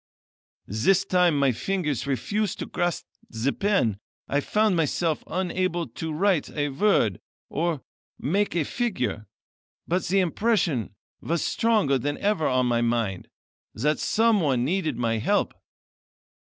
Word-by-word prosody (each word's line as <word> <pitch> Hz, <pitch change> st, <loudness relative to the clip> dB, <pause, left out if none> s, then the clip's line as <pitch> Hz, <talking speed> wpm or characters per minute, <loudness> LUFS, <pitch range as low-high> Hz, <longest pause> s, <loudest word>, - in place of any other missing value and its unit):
"This 125 Hz, -, +2 dB
time 180 Hz, -4 st, +3 dB
my 140 Hz, -2 st, +3 dB
fingers 150 Hz, -, -2 dB
refused 200 Hz, -, -1 dB
to -, -, -4 dB
grasp 175 Hz, -2 st, -2 dB, 0.2 s
the 115 Hz, +5 st, -1 dB
pen. 195 Hz, -, +1 dB, 0.3 s
I 140 Hz, -, +1 dB
found 210 Hz, +6 st, +2 dB
myself 165 Hz, 0 st, 0 dB
unable 185 Hz, -2 st, -1 dB
to 160 Hz, -1 st, -5 dB
write 180 Hz, +1 st, +1 dB
a 145 Hz, -1 st, -2 dB
word, 135 Hz, -, +2 dB, 0.3 s
or 160 Hz, -2 st, -1 dB, 0.3 s
make 195 Hz, +6 st, 0 dB
a 165 Hz, -4 st, +1 dB
figure; 125 Hz, -, -2 dB, 0.6 s
but 180 Hz, +2 st, 0 dB
the 195 Hz, +3 st, +2 dB
impression 175 Hz, -, 0 dB, 0.3 s
was 170 Hz, -1 st, -1 dB
stronger 210 Hz, -, +2 dB
than 145 Hz, +4 st, -2 dB
ever 200 Hz, -6 st, +1 dB
on 130 Hz, -1 st, +2 dB
my 120 Hz, -1 st, +1 dB
mind, 115 Hz, -5 st, -1 dB, 0.5 s
that 150 Hz, +8 st, 0 dB
someone 180 Hz, -, +2 dB
needed 160 Hz, -4 st, -1 dB
my 115 Hz, -2 st, 0 dB
help. 200 Hz, -, +1 dB
160 Hz, 130 wpm, -25 LUFS, 130-195 Hz, 0.6 s, time